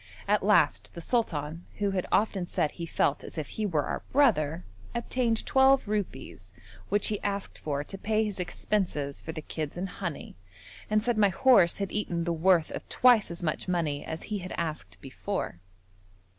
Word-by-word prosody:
At 210 Hz, +1 st, +3 dB
last 180 Hz, -7 st, +3 dB
the -, -, -6 dB
sultan, 165 Hz, -, -2 dB
who 205 Hz, -1 st, 0 dB
had 185 Hz, -2 st, -1 dB
often 200 Hz, -4 st, +1 dB
said 150 Hz, -, 0 dB
he 170 Hz, -1 st, -6 dB
felt 145 Hz, -2 st, +1 dB
as -, -, -9 dB
if 155 Hz, -3 st, -3 dB
he 215 Hz, -1 st, -2 dB
were 155 Hz, -6 st, +1 dB
our -, -, -3 dB
brother, 165 Hz, -, +3 dB, 0.3 s
obtained 235 Hz, -1 st, 0 dB
twelve 265 Hz, -2 st, +4 dB
rupees 195 Hz, -, -4 dB, 0.4 s
which 205 Hz, +1 st, +2 dB
he 210 Hz, -2 st, -2 dB
asked 200 Hz, -1 st, -3 dB
for 145 Hz, -1 st, -2 dB
to 195 Hz, +5 st, -8 dB
pay 220 Hz, +1 st, +1 dB
his 205 Hz, -3 st, -4 dB
expenses 175 Hz, -6 st, -2 dB
for 160 Hz, -, -6 dB
the 155 Hz, -1 st, -7 dB
kids 155 Hz, 0 st, -5 dB
and 185 Hz, +2 st, -2 dB
honey, 170 Hz, -4 st, -5 dB, 0.6 s
and 215 Hz, 0 st, +2 dB
said 235 Hz, -2 st, +1 dB
my 205 Hz, -1 st, +5 dB
horse 195 Hz, -3 st, +5 dB
had 200 Hz, -1 st, -3 dB
eaten 175 Hz, -5 st, -1 dB
the 170 Hz, 0 st, 0 dB
worth 170 Hz, 0 st, +3 dB
of -, -, -7 dB
twice 245 Hz, -4 st, +5 dB
as 170 Hz, +1 st, -7 dB
much 155 Hz, +2 st, -2 dB
money 165 Hz, -5 st, -1 dB
as 160 Hz, 0 st, -6 dB
he 210 Hz, -2 st, -3 dB
had 185 Hz, 0 st, -6 dB
asked 150 Hz, -, -4 dB
before. 135 Hz, -, -4 dB
185 Hz, 185 wpm, -28 LUFS, 155-210 Hz, 0.6 s, my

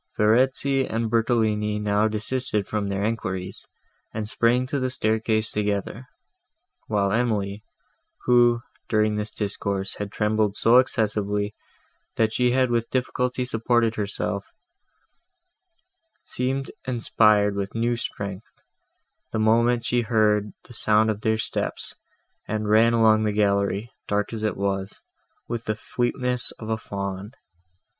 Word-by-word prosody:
Verezzi 130 Hz, +5 st, +3 dB
and 115 Hz, 0 st, -1 dB
Bertolini 110 Hz, -2 st, +1 dB
now 105 Hz, +1 st, +2 dB
desisted 110 Hz, -1 st, -2 dB
from 105 Hz, -2 st, -2 dB
their 100 Hz, 0 st, -1 dB
enquiries, 95 Hz, -4 st, -3 dB, 0.4 s
and 110 Hz, -1 st, -4 dB
sprang 120 Hz, +3 st, +2 dB
to 140 Hz, +2 st, -2 dB
the 130 Hz, 0 st, 0 dB
staircase 110 Hz, -2 st, +1 dB
together, 105 Hz, +4 st, -2 dB, 0.8 s
while 100 Hz, -2 st, +1 dB
Emily, 105 Hz, -3 st, 0 dB, 0.6 s
who, 120 Hz, -1 st, +4 dB, 0.3 s
during 110 Hz, -1 st, +2 dB
this 105 Hz, +1 st, -2 dB
discourse, 100 Hz, -2 st, -3 dB
had 100 Hz, -1 st, -5 dB
trembled 105 Hz, -1 st, +1 dB
so 115 Hz, +3 st, +5 dB
excessively, 105 Hz, -4 st, +1 dB, 0.6 s
that 110 Hz, -1 st, +1 dB
she 125 Hz, +2 st, +2 dB
had 130 Hz, 0 st, +2 dB
with 115 Hz, -1 st, 0 dB
difficulty 125 Hz, 0 st, -1 dB
supported 115 Hz, -1 st, +1 dB
herself, 100 Hz, -1 st, -3 dB, 1.8 s
seemed 135 Hz, +2 st, -2 dB, 0.2 s
inspired 110 Hz, -4 st, +3 dB
with 100 Hz, +1 st, -4 dB
new 120 Hz, +1 st, +1 dB
strength, 100 Hz, -3 st, -6 dB, 0.8 s
the -, -, -2 dB
moment 115 Hz, +2 st, +3 dB
she 120 Hz, +1 st, +2 dB
heard 105 Hz, -3 st, +2 dB
the -, -, -14 dB
sound 110 Hz, 0 st, +3 dB
of 105 Hz, 0 st, -5 dB
their 110 Hz, 0 st, +1 dB
steps, 110 Hz, -, -3 dB, 0.5 s
and 110 Hz, 0 st, -2 dB
ran 115 Hz, +2 st, +5 dB
along 110 Hz, -1 st, +5 dB
the 105 Hz, -, +1 dB
gallery, 100 Hz, +1 st, +1 dB, 0.2 s
dark 105 Hz, +2 st, -1 dB
as 110 Hz, -, -4 dB
it 105 Hz, -, -1 dB
was, 95 Hz, -1 st, -2 dB, 0.5 s
with 115 Hz, -1 st, -4 dB
the 110 Hz, -, -1 dB
fleetness 125 Hz, +2 st, -1 dB
of 110 Hz, -, -9 dB
a 110 Hz, -, 0 dB
fawn. 100 Hz, 0 st, -5 dB
110 Hz, 130 wpm, -24 LUFS, 105-120 Hz, 1.8 s, so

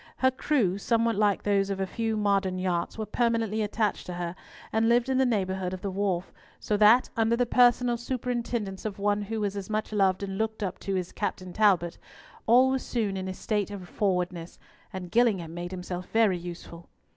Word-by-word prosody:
Her 260 Hz, 0 st, +3 dB
crew, 240 Hz, -8 st, 0 dB
somewhat 230 Hz, +1 st, +1 dB
like 205 Hz, -1 st, +2 dB
those 200 Hz, -1 st, +1 dB
of 195 Hz, -1 st, -2 dB
a 190 Hz, -, 0 dB
few 225 Hz, +3 st, -2 dB
modern 195 Hz, -3 st, +1 dB
yachts, 180 Hz, 0 st, -2 dB
were 220 Hz, -, -3 dB
permanently 230 Hz, -2 st, 0 dB
attached 210 Hz, 0 st, -1 dB
to 180 Hz, -, -5 dB
her, 175 Hz, 0 st, -4 dB, 0.4 s
and 225 Hz, +1 st, +3 dB
lived 240 Hz, +2 st, +3 dB
in 260 Hz, 0 st, +2 dB
the 265 Hz, -, +4 dB
neighbourhood 190 Hz, -4 st, -1 dB
of 185 Hz, -, -11 dB
the 200 Hz, -, -3 dB
wharf, 190 Hz, -2 st, -1 dB, 0.3 s
so 210 Hz, -, -1 dB
that, 215 Hz, +4 st, +5 dB
under 225 Hz, 0 st, +2 dB
the 245 Hz, +1 st, +1 dB
personal 245 Hz, 0 st, +4 dB
superintendence 235 Hz, -5 st, -3 dB
of 210 Hz, -3 st, -4 dB
one 205 Hz, +1 st, +1 dB
who 220 Hz, +2 st, -3 dB
was 205 Hz, -1 st, -1 dB
as 200 Hz, -1 st, -5 dB
much 215 Hz, 0 st, -2 dB
loved 195 Hz, -2 st, +2 dB
and 195 Hz, 0 st, -4 dB
looked 220 Hz, -1 st, -2 dB
up 185 Hz, -2 st, -3 dB
to 195 Hz, -1 st, -2 dB
as 180 Hz, -1 st, -3 dB
Captain 185 Hz, -1 st, -4 dB
Talbot, 185 Hz, -5 st, +2 dB, 0.5 s
all 255 Hz, +3 st, +6 dB
was 265 Hz, -1 st, 0 dB
soon 215 Hz, -5 st, -2 dB
in 190 Hz, 0 st, -4 dB
a 190 Hz, -, -3 dB
state 210 Hz, -1 st, -1 dB
of 195 Hz, -3 st, -8 dB
forwardness, 180 Hz, -3 st, -2 dB, 0.3 s
and 180 Hz, -2 st, -7 dB
Gillingham 200 Hz, -8 st, +2 dB
made 175 Hz, +1 st, -5 dB
himself 180 Hz, 0 st, -6 dB
very 215 Hz, -5 st, +3 dB
useful. 170 Hz, -1 st, -9 dB
205 Hz, 200 wpm, -27 LUFS, 185-225 Hz, 0.5 s, all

